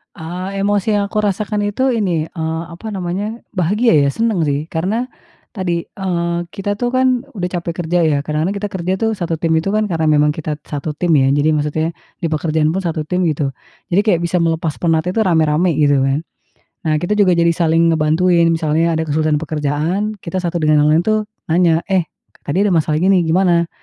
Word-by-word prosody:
Eee, 185 Hz, +4 st, -5 dB
emosi 205 Hz, +1 st, +1 dB
yang 205 Hz, -, +1 dB
aku 215 Hz, -, -1 dB
rasakan 210 Hz, +1 st, -1 dB
itu 260 Hz, +6 st, 0 dB
ini, 175 Hz, -9 st, -1 dB
eee, 160 Hz, -1 st, -3 dB
apa 220 Hz, +6 st, -9 dB
namanya 195 Hz, +5 st, -4 dB
bahagia 205 Hz, +4 st, +2 dB
ya, 140 Hz, -, +3 dB
senang 225 Hz, -4 st, 0 dB
sih. 145 Hz, +1 st, -1 dB
Karena 210 Hz, +10 st, -1 dB, 0.4 s
tadi, 175 Hz, -5 st, -2 dB
eee, 170 Hz, -3 st, -2 dB, 0.2 s
kita 205 Hz, +1 st, -3 dB
tuh 245 Hz, -, 0 dB
kan 255 Hz, 0 st, +2 dB
udah 180 Hz, -2 st, -2 dB
capek 170 Hz, -1 st, -3 dB
kerja 175 Hz, +2 st, +1 dB
ya, 150 Hz, -2 st, +2 dB
kadang-kadang 155 Hz, +6 st, -1 dB
kita 205 Hz, +1 st, -3 dB
kerja 185 Hz, 0 st, -2 dB
tuh 225 Hz, +2 st, 0 dB
1 170 Hz, -3 st, -2 dB
tim 165 Hz, -, +1 dB
itu 160 Hz, +5 st, -1 dB
kan 215 Hz, -, +2 dB
karena 160 Hz, -3 st, 0 dB
memang 150 Hz, -1 st, +4 dB
kita 150 Hz, 0 st, -4 dB
1 150 Hz, +1 st, -4 dB
tim 175 Hz, +2 st, 0 dB
ya, 135 Hz, -, +3 dB
jadi 145 Hz, +2 st, +2 dB
maksudnya 150 Hz, +2 st, -1 dB, 0.3 s
di 170 Hz, -, 0 dB
pekerjaan 155 Hz, 0 st, 0 dB
pun 190 Hz, +4 st, -1 dB
1 160 Hz, -2 st, -1 dB
tim 180 Hz, +3 st, -1 dB
gitu. 145 Hz, -3 st, 0 dB, 0.4 s
Jadi 185 Hz, +3 st, +3 dB
kayak 175 Hz, -6 st, +2 dB
bisa 170 Hz, +1 st, 0 dB
melepas 165 Hz, -2 st, 0 dB
penat 165 Hz, -1 st, +1 dB
itu 185 Hz, -, -1 dB
rame-rame 165 Hz, -2 st, +2 dB
gitu 145 Hz, -2 st, +3 dB
kan. 135 Hz, +2 st, 0 dB, 0.6 s
Nah, 155 Hz, -1 st, +1 dB
kita 175 Hz, +6 st, -2 dB
juga 205 Hz, -3 st, +4 dB
jadi 170 Hz, 0 st, +3 dB
saling 165 Hz, 0 st, +2 dB
ngebantuin 165 Hz, +2 st, +3 dB
misalnya 165 Hz, 0 st, +1 dB
ada 160 Hz, -, 0 dB
kesulitan 155 Hz, 0 st, +1 dB
pekerjaan 160 Hz, +7 st, -2 dB
kita 185 Hz, +2 st, -3 dB
satu 175 Hz, -1 st, -3 dB
dengan 155 Hz, -2 st, +3 dB
yang -, -, +3 dB
lain 165 Hz, -, +3 dB
tuh 215 Hz, -1 st, 0 dB, 0.2 s
nanya, 165 Hz, 0 st, +2 dB
"Eh, 185 Hz, -4 st, 0 dB, 0.3 s
tadi 180 Hz, +8 st, 0 dB
ada 205 Hz, -, +2 dB
masalah 155 Hz, -2 st, +1 dB
ini 185 Hz, +3 st, +3 dB
nih -, -, +1 dB
gimana, 170 Hz, -1 st, +2 dB
170 Hz, 200 wpm, -17 LUFS, 155-195 Hz, 0.6 s, memang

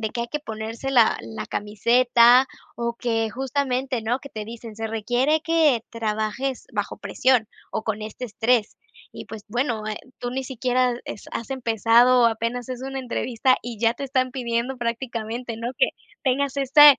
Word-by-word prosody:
de 220 Hz, -1 st, -2 dB
que 235 Hz, -, -2 dB
hay 235 Hz, -, -5 dB
que 300 Hz, -, -3 dB
ponerse 225 Hz, +2 st, -5 dB
la 235 Hz, -4 st, +5 dB
la 110 Hz, -1 st, -7 dB
camiseta 240 Hz, +4 st, +4 dB, 0.3 s
o 235 Hz, 0 st, -2 dB
que 225 Hz, -2 st, 0 dB
justamente, 265 Hz, -1 st, -1 dB
¿no? 240 Hz, +4 st, 0 dB
Que 280 Hz, -, -11 dB
te 215 Hz, -4 st, -6 dB
dicen: 230 Hz, 0 st, -9 dB
"Se 225 Hz, 0 st, -4 dB
requiere 245 Hz, +8 st, +1 dB
que 310 Hz, -8 st, +3 dB
trabajes 225 Hz, +4 st, -2 dB
bajo -, -, -2 dB
presión 250 Hz, -4 st, +2 dB, 0.2 s
o 220 Hz, -, -3 dB
con 215 Hz, -1 st, -2 dB
este 220 Hz, +4 st, -6 dB
estrés". 225 Hz, 0 st, +1 dB, 0.4 s
Y, -, -, -7 dB
pues, 215 Hz, -2 st, -9 dB
bueno, 235 Hz, -2 st, -1 dB
eh, 210 Hz, -, -3 dB, 0.2 s
tú 245 Hz, -, -3 dB
ni 265 Hz, +1 st, -3 dB
siquiera 250 Hz, -1 st, +1 dB
es -, -, -7 dB
has 230 Hz, -, -5 dB
empezado 240 Hz, 0 st, +4 dB
apenas 230 Hz, +2 st, -1 dB
es 255 Hz, -1 st, -5 dB
una 270 Hz, 0 st, -4 dB
entrevista 255 Hz, 0 st, +1 dB
y 240 Hz, -2 st, -6 dB
ya 230 Hz, 0 st, +4 dB
te 280 Hz, -, -5 dB
están 260 Hz, -1 st, +1 dB
pidiendo 245 Hz, 0 st, -2 dB
prácticamente, 235 Hz, -1 st, -3 dB
¿no? 235 Hz, +2 st, -4 dB
Que -, -, +4 dB, 0.3 s
tengas 280 Hz, +1 st, +1 dB
este, 280 Hz, +1 st, +8 dB
240 Hz, 175 wpm, -24 LUFS, 225-260 Hz, 0.4 s, este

